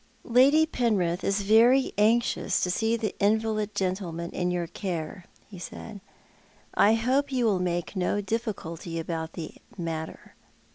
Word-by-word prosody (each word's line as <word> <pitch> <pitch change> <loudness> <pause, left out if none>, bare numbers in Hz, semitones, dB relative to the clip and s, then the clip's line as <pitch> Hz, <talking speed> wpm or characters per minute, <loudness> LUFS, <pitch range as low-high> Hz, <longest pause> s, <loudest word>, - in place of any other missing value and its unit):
" - - -35
Lady 275 +6 +5
Penrith 200 - 0
is 200 +1 0
very 235 +6 +5
anxious 225 +3 +2
to 180 - +1
see 225 +4 +1
the 220 -3 -2
invalid 215 0 +1
gentleman 180 -3 -2
in 180 0 -1
your 175 -1 -1
care," 175 -1 -5 0.2
he 190 -4 -11
said. 200 +3 -8 0.4
" - - -32 0.3
I 215 +2 +5
hope 265 +5 +1
you 250 -2 +1
will 200 -4 +2
make 175 +1 -2
no 185 +2 0
difficulty 190 -6 -4
about 160 0 -4
the 160 -2 -7 0.2
matter." 160 -2 -5
200 Hz, 150 wpm, -27 LUFS, 175-225 Hz, 0.4 s, Lady